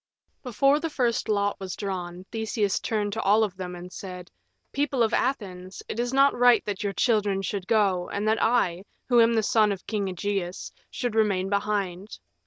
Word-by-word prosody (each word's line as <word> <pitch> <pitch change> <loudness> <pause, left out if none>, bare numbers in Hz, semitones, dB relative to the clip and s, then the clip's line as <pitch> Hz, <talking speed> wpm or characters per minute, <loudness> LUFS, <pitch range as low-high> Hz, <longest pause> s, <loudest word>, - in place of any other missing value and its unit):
Before 275 +4 +2
the 330 +1 -3
first 240 -6 -1
lot 205 -1 0
was 190 -2 -5
drawn 185 -2 -5
Theseus 220 -3 -1
turned 210 -2 -2
to 225 - -2
all 210 +3 +4
of 200 -4 -2
them 180 -1 -6
and 180 +1 -10
said, 180 -2 -8 0.4
"People 275 -3 +1
of 220 - 0
Athens, 190 -8 -2
it 230 - -5
is 245 0 -1
not 275 +1 +4
right 245 -1 +4
that 205 0 -4
your 200 -1 -2
children 205 -4 +1
should 195 -1 -4
go 195 -5 +2
and 205 +1 -2
that 220 +1 +2
I, 190 -7 +2 0.3
who 240 -2 +6
am 230 0 +4
the 220 - +2
son 215 0 +3
of 195 -2 -5
King 210 -3 -2
Ægeus, 190 -1 -3 0.2
should 245 -3 -3
remain 200 -4 +1
behind. 200 -1 -2
205 Hz, 190 wpm, -26 LUFS, 190-230 Hz, 0.4 s, who